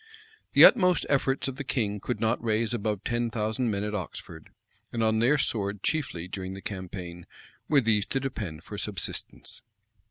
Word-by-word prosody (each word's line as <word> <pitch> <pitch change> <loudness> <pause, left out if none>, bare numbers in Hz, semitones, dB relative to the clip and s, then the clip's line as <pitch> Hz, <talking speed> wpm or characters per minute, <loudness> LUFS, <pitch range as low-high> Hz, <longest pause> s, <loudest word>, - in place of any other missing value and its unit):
The - - +10
utmost 180 - +5
efforts 135 -1 +1
of 135 -1 -5
the 140 - -3
king 105 -6 -1
could 125 - -3
not 115 +1 0
raise 110 0 +1
above 105 -3 -2
ten 120 -2 -1
thousand 110 +2 -1
men 100 -1 -1
at 105 0 -3
Oxford; 85 -4 -7 0.4
and 115 -1 -1
on 110 0 +2
their 130 +6 +4
sword 100 -7 -1
chiefly, 110 - -1
during 95 0 -6
the - - -8
campaign, 90 -3 -7 0.4
were 145 -3 +5
these 110 -3 +2
to 135 - 0
depend 105 - -5
for - - -7
subsistence. - - -3
110 Hz, 170 wpm, -27 LUFS, 100-125 Hz, 0.4 s, The